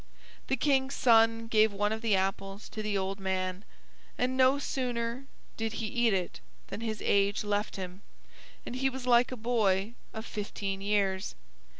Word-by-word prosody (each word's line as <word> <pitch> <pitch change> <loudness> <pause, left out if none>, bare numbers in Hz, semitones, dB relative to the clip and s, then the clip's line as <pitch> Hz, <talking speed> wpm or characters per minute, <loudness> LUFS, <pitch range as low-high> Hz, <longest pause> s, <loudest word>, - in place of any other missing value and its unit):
The 265 - +1
King's 270 0 +2
son 225 -1 +4
gave 220 -1 +4
one 205 +1 0
of 220 0 -2
the 225 -4 +3
apples 195 +1 -2
to 215 - -5
the 210 -1 -1
old 195 +1 -2
man, 185 0 -2 0.5
and 255 +1 0
no 260 +1 +5
sooner 250 -2 -2 0.3
did 225 -1 -2
he 225 - -3
eat 235 +1 +2
it 185 - -1 0.3
than - - -5
his 220 -2 -3
age 200 +1 +2
left 205 0 -1
him, 185 0 -6 0.6
and 245 - -5
he 270 +1 +1
was 260 -1 -6
like 245 0 +4
a 255 - -4
boy 215 -3 +1 0.2
of 220 +1 -6
fifteen 200 -2 -4
years. 195 - 0
220 Hz, 170 wpm, -30 LUFS, 195-240 Hz, 0.6 s, no